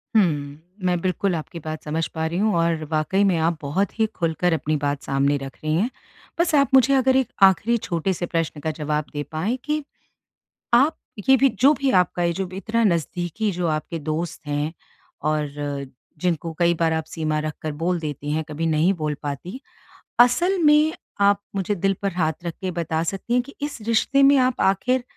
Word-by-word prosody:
हुँ। 215 - +7 0.6
मैं 180 -1 +2
बिल्कुल 185 +1 0
आपकी 165 +2 -6
बात 155 0 -5
समझ 160 +2 -1
पा 160 0 -1
रही 170 +2 -3
हूँ 215 +1 +2
और 165 -1 +1
वाक़ई 160 +6 +1
में 190 -4 +3
आप 165 +1 +1
बहुत 190 +10 -2
ही 220 - +4
खुलकर 170 +1 0
अपनी 155 -1 0
बात 145 -1 -2
सामने 140 +1 +1
रख 135 -1 -8
रही 155 0 0
हैं। 205 +9 +1 0.5
बस 340 -1 +2
आप 280 -1 +4
मुझे 265 +1 +6
अगर 260 0 +3
एक 265 -3 +3 0.2
आख़िरी 200 +5 +5
छोटे 180 -2 -1
से 175 - -3
प्रश्न 165 -3 -2
का 160 - -1
जवाब 150 0 -1
दे 145 0 -3
पाएँ 190 +11 -1
कि 300 0 -1 0.9
आप 275 +7 +4 0.3
ये 265 - +9
भी 275 +1 +4
जो 275 +5 +6
भी 275 -2 0
आपका 175 0 -2
ये 170 0 +1
जो 190 +1 -3
इतना 220 +4 -1
नज़दीकी 175 +2 0
जो 175 -2 -2
आपके 155 +1 -2
दोस्त 155 +1 -4
हैं 145 +2 -1 0.6
और 155 -1 0 0.7
जिनको 170 -1 -1
कई 170 0 +4
बार 165 -1 +2
आप 160 - -1
सीमा 155 -2 -2
रखकर 155 0 -4
बोल 170 +4 -1
देती 145 -1 -4
हैं, 160 +1 0
कभी 155 +2 -3
नहीं 160 +5 +3
बोल 155 -3 -2
पाती। 145 - -5 0.6
असल 345 +11 +4
में 300 +1 +5 0.3
आप 200 0 +4 0.2
मुझे 195 +1 -1
दिल 195 +1 +1
पर 200 -1 0
हाथ 160 -3 +1
रख 170 - -2
के 185 - -2
बता 165 -2 -2
सकती 195 +7 -3
हैं 250 - +4
कि 280 - -13
इस 290 -6 -4
रिश्ते 270 +5 +3
में 275 0 +6
आप 255 -1 +2
आख़िर 245 +7 +2
175 Hz, 195 wpm, -23 LUFS, 155-220 Hz, 0.9 s, ये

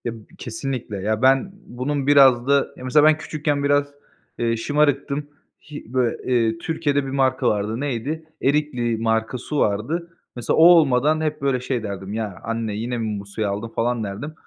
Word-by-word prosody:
Ya, 120 - -1
b 105 - -18
kesinlikle, 120 -2 -5
ya, 110 +3 -1
ben 135 +8 +3
bunun 135 +3 -3
biraz 135 -4 +6
da 140 0 +3
Ya, - - -10
mesela 145 +4 +4
ben 155 0 +5
küçükken 150 -2 -2
biraz, 145 0 +2 0.5
eee, 115 -1 0
şımarıktım. 145 +2 0 0.4
Hi 140 -5 -9
böyle, 125 -3 +1 0.2
eee, 115 -2 +2
Türkiye'de 145 +1 -1
bir - - -5
marka 130 -2 +1
vardı, 105 +2 -2
neydi? 145 +4 -3 0.2
Erikli 135 -5 0
marka 115 +2 0
su 145 +4 -4
vardı. 160 +12 -1 0.2
Mesela 120 -1 -1
o 160 - +7
olmadan 155 -3 +5
hep 155 -2 -2
böyle 135 -2 +1
şey 125 -2 -3
derdim: 100 -1 -6
"Ya, 105 -4 -4
anne 115 -2 -3
yine 120 +3 -3
mi 110 -3 -3
bu 100 - -9
suyu 105 +1 -3
aldın?" 100 +3 -3
falan 115 +1 -1
derdim. 105 +10 -6
125 Hz, 180 wpm, -22 LUFS, 115-145 Hz, 0.5 s, o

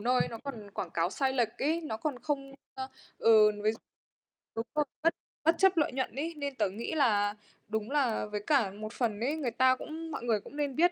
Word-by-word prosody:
nơi 250 +3 +3
nó 230 - -6
còn 220 -7 -6
quảng 185 -3 -4
cáo 170 +1 +1
sai 265 +4 +1
lệch 240 -4 0
ấy. 315 +4 +2
Nó 300 -9 -4
còn 280 +1 -2
không 275 -2 -2 0.2
ơ, 260 0 -4 0.3
ừ, 215 -2 +7
ví 215 - +5
dụ 225 - -10 0.8
đúng 225 +1 -2
rồi 300 -1 +3 0.2
bất 330 +1 +4 0.3
bất 325 +1 +5
chấp 385 0 +5
lợi 300 - +3
nhuận 260 -2 -2
ấy, 320 +5 -2
nên 285 -2 -3
tớ 210 -5 +1
nghĩ 215 +10 -4
là 210 -8 +3 0.3
đúng 220 +3 -2
là 270 -8 +2
với 210 -1 -4
cả 255 -10 +4
một 215 +3 -7
phần 220 -5 0
ấy, 265 +7 0
người 280 -7 -1
ta 255 +2 +4
cũng 320 +4 -7
mọi - - -4
người 230 -3 +2
cũng 205 - -13
nên 285 -3 -1
biết. 350 +4 +5
255 Hz, 230 wpm, -31 LUFS, 215-290 Hz, 0.8 s, ừ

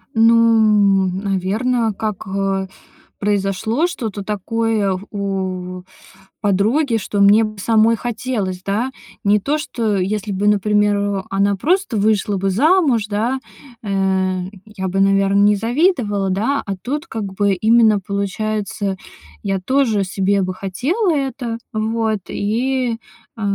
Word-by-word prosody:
Ну, 220 -4 +4
м, 185 +1 -3
наверно, 210 +4 0
как, 210 -1 -4
э, 195 0 -1 0.5
произошло 205 - 0
что-то 220 - -4
такое 210 -1 -1
у 185 -2 -4 0.6
подруги, 225 +7 +1
что 200 0 -3
мне 205 +3 +6
б 215 -1 -5
самой 225 +2 +3
хотелось, 215 -6 -3
да? 225 +7 -1 0.3
Не 210 +1 +4
то 295 +6 0
что 225 -8 -2
если 200 +2 -2
бы, 200 +2 0
например, 205 -1 +1
она 200 +1 +1
просто 340 - 0
вышла 205 -1 +1
бы 195 +1 0
замуж, 270 - +3
да, 225 +6 -1 0.4
э, 210 - -5 0.8
я 200 -3 -5
бы, 195 +2 0
наверно, 195 0 +3
не 210 0 +5
завидовала, 230 - +1
да? 225 +10 0
А 195 -2 -3
тут 295 +6 -4
как 220 -7 -4
бы 200 0 +1
именно, 220 +1 +4
получается, 200 0 -3 0.5
я 195 -1 -1
тоже 225 -2 +1
себе 195 +1 0
бы 185 0 -2
хотела 275 - -1
это, 265 -5 -3 0.2
вот, 220 -1 -1
и, 240 +3 -1 0.4
э, - - -8
210 Hz, 125 wpm, -19 LUFS, 195-230 Hz, 0.8 s, мне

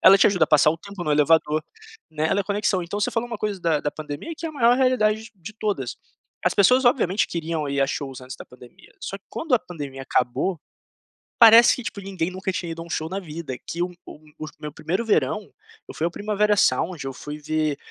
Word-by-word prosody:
ela 195 - +8
te 195 - +5
ajuda 185 -6 +3
a - - -9
passar 150 0 +5
o 165 - -3
tempo 200 +1 -8
no 155 - -2
elevador, 150 +1 +3 0.5
né, 155 0 -1
ela 195 - +1
é - - 0
conexão. 200 -1 0
Então, 200 +5 -4
você 210 - +1
falou 230 +1 -1
uma 230 - -4
coisa 205 -3 -3
da 160 -3 +1
da 145 - -1
pandemia 155 - -7
que 330 - -5
é - - -2
a - - -9
maior 245 -4 +4
realidade 220 -5 +2
de - - -12
de 190 +3 -10
todas, 205 - -3 0.5
as - - +2
pessoas 250 +6 +5
obviamente 215 -5 +3
queriam 165 -3 -3
ir 140 0 -1
a 135 - +4
shows 135 -2 -4
antes 130 0 -9
da - - -10
pandemia, 125 -1 -17
só 195 - -5
que 200 - -49
quando 320 -4 -5
a 245 - +4
pandemia 145 -8 -8
acabou, 140 +7 0 0.8
parece 230 0 +8
que, 250 - -7
tipo, 200 - -5
ninguém 185 -3 -3
nunca 190 +1 -3
tinha 170 -2 -4
ido 165 0 -6
a - - -8
um - - -14
show 160 -1 -2
na 195 +1 -3
vida, 155 -6 -7
que 175 +1 -2
um 180 - -3 0.2
um 150 0 -13
os 155 0 -6
meu 150 -1 -6
primeiro 185 +9 -3
verão, 215 -1 0 0.3
eu - - -9
fui 160 - -2
ao 170 - -1
Primavera 210 +1 +1
Sound, 175 -5 +1
eu 135 - -3
fui 150 +3 -7
ver 155 -1 -1
175 Hz, 240 wpm, -23 LUFS, 150-210 Hz, 0.8 s, ela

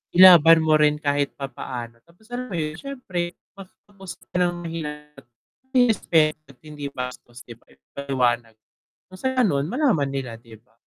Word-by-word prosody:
ilaban 165 -3 +8
mo 155 -1 +3
rin 150 0 +4
kahit 145 -1 -1
papaano, 120 -4 -7
tapos 175 +6 -24
alam 250 +1 -4
mo 195 - -6
yun 155 -2 -2
siyempre 190 -11 -5 0.2
matapos 195 -1 -13 0.2
ng 180 -1 +1
mahinahon, 150 -3 -7 0.5
may 245 -2 +5
respeto 155 -5 +1
at 135 - -17
hindi 150 -2 -7
bastos 125 -1 -8
'di 120 - -10
ba - - -32
na 65 - -24
paliwanag, 120 -5 -1 0.5
kung 185 - -13
sa 260 - -1
ganun 150 - +1
malaman 230 - +1
nila 135 -3 -5
'di 115 -2 -15
ba, 120 - -34
150 Hz, 160 wpm, -23 LUFS, 135-180 Hz, 0.5 s, ilaban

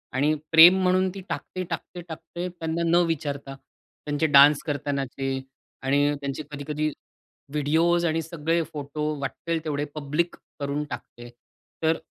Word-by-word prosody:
आणि 145 +3 +3 0.2
प्रेम 175 +4 +9
म्हणून 185 +1 +3
ती 195 - -7
टाकते, 185 - -4
टाकते, 175 0 -6
टाकते. 170 +1 -6
त्यांना 165 -1 -3
न 175 +1 +5
विचारता, 140 -3 -3
त्यांचे 145 +2 -5
डान्स 145 0 +7
करतानाचे 140 -2 -2 0.5
आणि 145 +2 +2
त्यांचे 140 +2 -4
कधी-कधी 150 +1 -2 0.7
व्हिडिओस 165 +4 +2
आणि 165 0 +1
सगळे 165 +1 -1
फोटो 150 0 -4 0.2
वाटेल 165 +3 -3
तेवढे 145 -1 -1
पब्लिक 150 +4 -1 0.2
करून 140 +1 -2
टाकते. 120 0 -8 0.5
तर 160 +1 +3
155 Hz, 130 wpm, -25 LUFS, 145-170 Hz, 0.7 s, प्रेम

